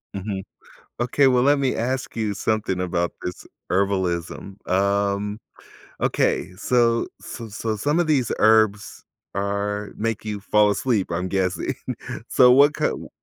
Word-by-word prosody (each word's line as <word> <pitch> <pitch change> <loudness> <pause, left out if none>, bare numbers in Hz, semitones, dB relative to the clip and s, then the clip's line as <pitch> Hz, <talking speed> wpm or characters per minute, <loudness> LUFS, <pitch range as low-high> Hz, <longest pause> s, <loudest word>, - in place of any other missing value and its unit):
Mhm. 95 -1 -4 0.6
Okay, 135 +3 +3
well, 125 -1 +4
let 145 +1 +4
me 135 -2 +1
ask 130 +3 -2
you 110 -3 -1
something 105 -3 -1
about 85 -1 -1
this 90 - -6 0.2
herbalism. 95 -1 -1 0.2
Um, 100 +2 +1 0.6
okay, 90 - 0
so 115 +2 +2
so 115 -2 -8
so 110 +1 -3
some 145 +10 0
of 175 - +1
these 135 -6 +1
herbs 110 -1 +3 0.3
are 100 +1 -2
make 115 -1 -2
you 105 -1 -3
fall 105 +1 +3
asleep, 105 -1 0
I'm 90 +2 -2
guessing. 95 -1 -1 0.6
So, 125 -1 +6
what 145 +3 +6
k - - -1
w - - -5
105 Hz, 140 wpm, -23 LUFS, 100-120 Hz, 0.6 s, So